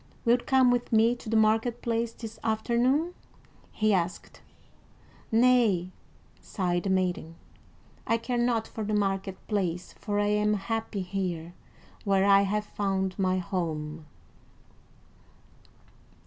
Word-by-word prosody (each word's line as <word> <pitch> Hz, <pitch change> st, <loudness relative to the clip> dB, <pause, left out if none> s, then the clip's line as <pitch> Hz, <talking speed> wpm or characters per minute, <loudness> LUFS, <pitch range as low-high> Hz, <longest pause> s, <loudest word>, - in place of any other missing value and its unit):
"Wilt 240 Hz, +1 st, +2 dB
come 260 Hz, -2 st, +5 dB
with 245 Hz, 0 st, -1 dB
me 225 Hz, +2 st, +4 dB
to 240 Hz, -2 st, -9 dB
the 225 Hz, -, +2 dB
market 225 Hz, +2 st, +2 dB
place 230 Hz, 0 st, 0 dB
this 225 Hz, -1 st, -9 dB
afternoon?" 240 Hz, +9 st, +1 dB, 0.6 s
he 215 Hz, -1 st, +1 dB
asked. 175 Hz, -1 st, -2 dB, 0.9 s
"Nay," 225 Hz, -6 st, +3 dB, 0.5 s
sighed 175 Hz, -3 st, -2 dB
the -, -, 0 dB
maiden. 180 Hz, -3 st, -1 dB, 0.7 s
"I 230 Hz, -, +3 dB
care 240 Hz, +1 st, -2 dB
not 235 Hz, -2 st, +1 dB
for 220 Hz, -, -6 dB
the 210 Hz, 0 st, -1 dB
market 195 Hz, -2 st, -1 dB
place, 180 Hz, -4 st, -2 dB
for 205 Hz, -1 st, -2 dB
I 205 Hz, -, +2 dB
am 210 Hz, 0 st, +2 dB
happy 215 Hz, -1 st, -3 dB
here, 180 Hz, -3 st, -4 dB, 0.5 s
where 195 Hz, -2 st, +2 dB
I 200 Hz, 0 st, +6 dB
have 210 Hz, +2 st, -1 dB
found 195 Hz, -2 st, -2 dB
my 185 Hz, -1 st, +2 dB
home." 160 Hz, -5 st, -4 dB
210 Hz, 125 wpm, -28 LUFS, 185-230 Hz, 0.9 s, I